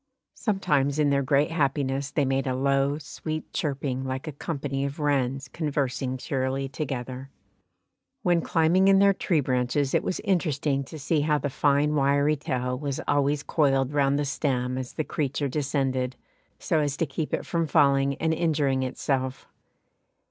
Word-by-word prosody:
Sometimes 145 - 0
in 150 -2 +3
their 140 0 +2
great 140 +3 +2
happiness 140 -3 0
they 145 - +1
made 135 +1 0
a 130 - 0
low, 140 +2 +1
sweet 155 +1 -6
chirping 135 -3 -2
like 130 +3 -4
a - - -2
company 140 -2 -3
of 140 +2 -4
wrens 135 -2 0
conversing 135 -4 -2
cheerily 135 +1 -2
together. 135 -2 -5 0.9
When 175 -1 +3
climbing 170 +5 +3
in 195 0 +6
their 200 0 +5
tree 170 -4 +1
branches 130 +2 0
it - - +3
was 185 - -2
interesting 155 -8 0
to 155 - -9
see 150 +1 0
how 150 0 +2
the 145 0 -3
fine 145 +2 +2
wiry 140 +1 +3
tail 125 -3 -2
was 140 -2 -3
always 145 0 +1
coiled 135 -3 +1
round 140 -1 +2
the 145 - 0
stem 130 -2 -1
as 130 -1 -5
the 155 - -2
creature 145 -1 -2
descended, 135 -2 -1 0.4
so 160 - 0
as 145 -2 -1
to 165 - +1
keep 150 +2 -4
it - - -2
from 165 -2 -1
falling 140 -2 +3
and 160 +2 0
injuring 150 -5 +1
itself. 130 0 -2
140 Hz, 165 wpm, -26 LUFS, 135-150 Hz, 0.9 s, in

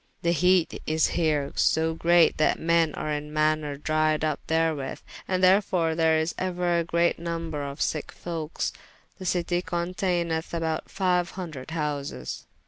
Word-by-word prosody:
The 170 - +3
heate 180 +1 +2
is 155 +1 +2
here 150 -4 0
so 160 0 +2
great, 170 +1 +4
that 155 - +3
men 165 -1 +2
are 155 - -3
in 150 0 -3
maner 155 -1 +1
dryed 155 +1 +1
up 155 -2 -1
therewith. 160 -4 0
[p.357] - - -14
And 185 0 0
therefore 185 -3 +3
there 160 -1 +3
is 160 +2 0
euer 180 -2 0
a - - +1
great 170 +1 +1
number 165 -3 -3
of 140 0 -6
sicke 155 - -1
folkes. 165 -2 -4 0.5
The 185 - -5
citie 175 0 0
conteyneth 175 -2 -2
about 160 -1 -1
fyue 180 -2 +1
hundred 160 -8 -7
houses. 145 - -4
165 Hz, 155 wpm, -26 LUFS, 155-175 Hz, 0.5 s, great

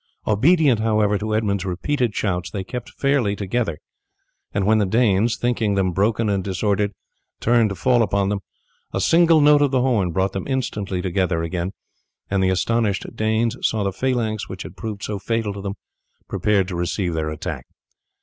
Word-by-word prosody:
Obedient, 135 - +4
however, 105 -2 +2
to 110 0 -1
Edmund's 100 -3 0
repeated 110 +6 -1
shouts 90 -4 -1
they 95 - -4
kept 125 +5 -6
fairly 135 -7 +1
together, 100 -4 -2 0.7
and 100 -1 0
when 110 +1 +4
the 105 - +2
Danes, 110 +1 +2
thinking 115 -4 0
them 95 -2 +1
broken 105 +5 +1
and 100 -2 0
disordered, 100 +2 0 0.5
turned 115 -2 +3
to 100 - -4
fall 125 +3 +3
upon 100 -2 +1
them, 100 -1 -1 0.5
a - - 0
single 165 -2 +5
note 145 0 +6
of 145 - +4
the 130 -1 +1
horn 110 -9 +1
brought 95 +3 0
them 95 - -4
instantly 105 -8 -2
together 90 -2 0
again, 85 +2 -2 0.6
and 95 -1 +2
the 95 - +3
astonished 105 +2 0
Danes 110 +1 +1
saw 110 -2 +1
the 100 -1 -1
phalanx 115 -3 -1
which - - -6
had - - -10
proved 105 -3 -6
so 105 -2 -3
fatal 110 0 -1
to 100 - -7
them 100 0 -4 0.5
prepared 100 -3 +1
to 90 - -4
receive 85 +1 -1
their 80 -1 -1
attack. 75 -1 -5
105 Hz, 180 wpm, -22 LUFS, 95-115 Hz, 0.7 s, note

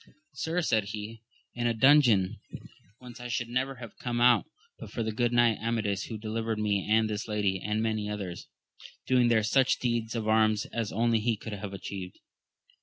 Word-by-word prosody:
Sir, 165 +5 -2
said 110 -9 +1
he, 105 +2 -7 0.3
in 120 0 -1
a 115 - 0
dungeon 120 -7 +5 0.6
whence 125 -1 -12
I 120 - -6
should 120 -1 -2
never 130 +2 -1
have 120 -3 -11
come 120 -1 -2
out 120 0 +5 0.3
but - - -9
for 115 - -3
the 110 - -2
good 120 +2 0
knight 120 -2 +3
Amadis, 110 -4 -1
who 110 - -6
delivered 110 +1 -3
me 105 -2 0
and 110 0 +4
this 105 0 -4
lady, 100 -3 0
and 105 +2 -1
many 110 -2 -1
others, 95 -4 -5 0.6
doing 125 -2 +3
there 115 -2 +3
such 130 +4 +3
deeds 120 -2 -2
of 110 -2 -2
arms 110 -1 +3
as 115 -3 -2
only 115 +1 +2
he 115 0 0
could 110 +1 -7
have 100 -1 -6
atchieved. 95 -1 -7
110 Hz, 185 wpm, -29 LUFS, 105-120 Hz, 0.6 s, dungeon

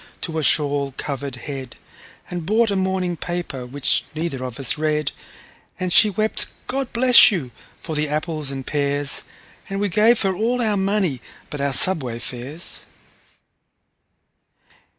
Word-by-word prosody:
to 160 -2 -3
a - - -2
shawl 140 -2 +3
covered 140 -2 -4
head, 130 -1 -7 0.5
And 175 -1 -5
bought 215 +5 +2
a - - 0
morning 190 -2 -1
paper, 170 -8 -5
which 140 +2 0
neither 155 -5 -3
of 125 -1 -6
us 135 - +2
read; 150 -1 -1 0.7
And 185 -1 -2
she 215 - +7
wept, 215 +2 +1 0.2
"God 270 -1 -3
bless 250 +1 +7
you!" 160 - -3 0.3
for 160 - -6
the 150 0 -1
apples 155 -1 -1
and 135 -1 -5
pears, 145 -1 +1 0.5
And 195 0 -3
we 205 0 0
gave 215 +6 +3
her 190 -1 0
all 235 +5 0
our 220 -3 +1
money 195 - 0 0.3
but 145 - -5
our 140 0 0
subway 135 -6 +3
fares. 130 +8 -2
155 Hz, 150 wpm, -21 LUFS, 140-195 Hz, 0.7 s, she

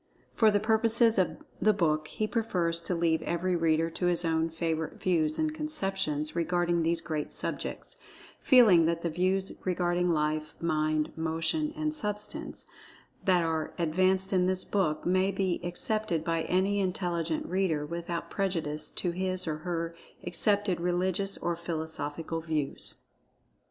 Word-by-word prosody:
For 220 - +5
the 205 -1 +3
purposes 225 +1 +4
of 185 - -1 0.2
the 215 - +5
book, 155 -5 +1
he 215 - -2
prefers 180 -7 0
to 180 - 0
leave 165 -1 +1
every 175 +2 -1
reader 165 0 +2
to 180 +2 -1
his 175 0 +2
own 160 0 +1
favorite 160 -1 -3
views 160 -4 +1
and 310 -1 0
conceptions 195 - -2
regarding 175 0 +1
these 165 +1 +1
great 155 -3 -3
subjects, - - -5 0.4
feeling 210 - +6
that 170 0 -1
the 170 - -1
views 190 +3 0
regarding 180 -1 +1
Life, 155 -1 0
Mind, 155 -2 0
Motion 165 - -1
and 310 0 -1
Substance, 210 -7 -4 0.6
that 180 -3 +4
are 160 -1 -2
advanced 185 +3 +1
in 180 -1 +3
this 185 0 +1
book, 165 -7 0
may 185 +2 +3
be 190 -2 -1
accepted 175 -1 -1
by 165 -1 -1
any 195 +3 +1
intelligent 175 -4 -1
reader, 175 -5 0
without 170 +1 -5
prejudice 165 -6 -2
to 175 - -1
his, 185 +1 -2
or 155 -1 -1
her, 170 0 -3 0.3
accepted 190 +2 +1
religious 185 +2 0
or 175 - -1
philosophical 160 -1 -4
views. 155 -4 -2
175 Hz, 145 wpm, -29 LUFS, 160-190 Hz, 0.6 s, feeling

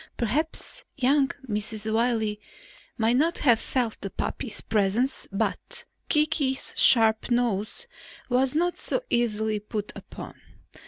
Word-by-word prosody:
Perhaps 310 - -2
young 275 +1 +3 0.2
Mrs. 215 0 -2
Wiley 220 -2 +1 0.6
might 230 +1 +3
not 330 +5 +2
have 240 -5 +4
felt 245 -4 -2
the 195 - -3
puppy's 220 +3 -4
presence 220 +5 0
but 350 - -2 0.2
Kiki's 300 -3 +1
sharp 225 -3 +5
nose 240 - 0 0.4
was 255 +2 +2
not 350 +2 +1
so - - 0
easily 220 -2 +1
put 210 0 -4
upon. - - -10
235 Hz, 115 wpm, -26 LUFS, 215-270 Hz, 0.6 s, sharp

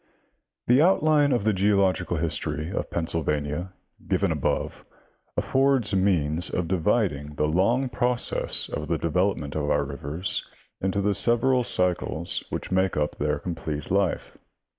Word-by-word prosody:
— - - -55
The 125 +4 +5
outline 155 -4 +4
of 120 -5 +1
the 110 0 +2
geological 95 -3 +1
history 80 0 -2
of - - -3
Penn 85 - -2
sylvania 75 +2 -2 0.4
given - - +1
above - - -2 0.5
affords 135 -5 +2
means 85 -4 +2
of 85 -1 -2
dividing 75 -4 0
the 75 - +1
long 100 - +2
progress 125 0 0
of 75 - -5
the 85 +1 0
development 85 -3 0
of 75 -2 -1
our 75 - +2
rivers 70 +6 -2 0.4
into 95 +1 0
the 100 +1 +1
several 120 +5 +2
cycles 90 -5 -1
which - - -5
make 95 -1 +1
up 75 0 -1
their - - 0
complete 80 -4 -5
life. 100 -3 -1
90 Hz, 140 wpm, -25 LUFS, 75-105 Hz, 0.5 s, The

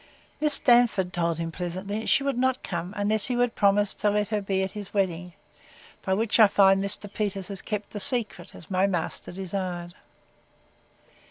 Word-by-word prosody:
Miss 300 -1 +6
Darnford 235 -7 +3
told 170 -3 -1
him 165 0 -4
pleasantly, 185 +5 -5
She 275 - +3
would 275 -2 -1
not 260 +1 0
come, 175 0 -4
unless 205 +1 0
he 250 - -1
would 245 -1 +1
promise 205 0 +2
to 210 - 0
let 210 0 0
her 210 -1 -1
be 195 -1 -1
at 190 - -3
his 205 -1 -9
wedding; 180 -3 -1 0.7
by 190 - 0
which 220 +2 0
I 215 - +9
find 195 -1 +4
Mr. 200 +1 +1
Peters 200 -3 -3
has 195 -1 -4
kept 210 -1 -5
the 210 - -6
secret, 230 -8 0
as 170 - -14
my 185 +1 +2
master 175 -4 -3
desired. 180 -2 -5
200 Hz, 180 wpm, -26 LUFS, 185-215 Hz, 0.7 s, I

